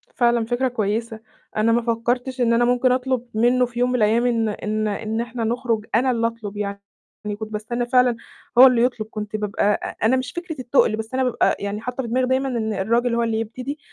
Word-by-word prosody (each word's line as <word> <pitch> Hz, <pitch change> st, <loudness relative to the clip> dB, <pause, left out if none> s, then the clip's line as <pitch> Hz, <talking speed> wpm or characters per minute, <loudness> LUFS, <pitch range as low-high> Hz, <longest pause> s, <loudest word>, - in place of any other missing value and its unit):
فعلًا 235 Hz, -2 st, +2 dB
فكرة 245 Hz, +3 st, 0 dB
كويسة، 225 Hz, -1 st, -2 dB, 0.4 s
أنا 220 Hz, +2 st, +3 dB
ما 235 Hz, +1 st, +3 dB
فكّرتش 245 Hz, +3 st, -1 dB
إن 235 Hz, -1 st, +3 dB
أنا 240 Hz, +1 st, +3 dB
ممكن 250 Hz, +1 st, +2 dB
أطلُب 255 Hz, -1 st, -1 dB
منّه 245 Hz, +3 st, +3 dB
في 240 Hz, 0 st, -7 dB
يوم 245 Hz, 0 st, +2 dB
من 250 Hz, -, 0 dB
الأيام 225 Hz, +1 st, +2 dB
إن 230 Hz, -2 st, +1 dB
إن 215 Hz, +1 st, -2 dB
إن 215 Hz, +2 st, -2 dB
إحنا 235 Hz, 0 st, -4 dB
نخرُج، 230 Hz, -1 st, -1 dB
أنا 255 Hz, +3 st, +3 dB
اللي 230 Hz, -1 st, +1 dB
أطلُب 220 Hz, -3 st, -7 dB
يعني، 200 Hz, -1 st, -3 dB, 0.6 s
كنت 220 Hz, 0 st, -6 dB
باستنّى 235 Hz, +3 st, -2 dB
فعلًا 250 Hz, -1 st, +3 dB, 0.4 s
هو 260 Hz, +2 st, +11 dB
اللي 245 Hz, -2 st, +3 dB
يطلُب، 240 Hz, -4 st, -1 dB
كنت 210 Hz, 0 st, -5 dB
بابقى 210 Hz, -2 st, -2 dB, 0.2 s
أ -, -, -4 dB
أنا 240 Hz, +4 st, +4 dB
مش 255 Hz, -1 st, -3 dB
فكرة 345 Hz, -2 st, -6 dB
التُقْل، 245 Hz, -3 st, +2 dB
بس 220 Hz, +2 st, -7 dB
أنا 260 Hz, 0 st, +1 dB
بابقى 250 Hz, -2 st, +2 dB
يعني 200 Hz, +1 st, -4 dB
حاطّة 250 Hz, +2 st, -4 dB
في -, -, -5 dB
دماغي 255 Hz, +2 st, +1 dB
دايمًا 260 Hz, +1 st, +1 dB
إن 225 Hz, -4 st, -2 dB
الراجل 235 Hz, +4 st, +1 dB
هو 235 Hz, -, +1 dB
اللي 225 Hz, -1 st, 0 dB
يبتدي، 255 Hz, +6 st, -5 dB
235 Hz, 215 wpm, -22 LUFS, 220-250 Hz, 0.6 s, هو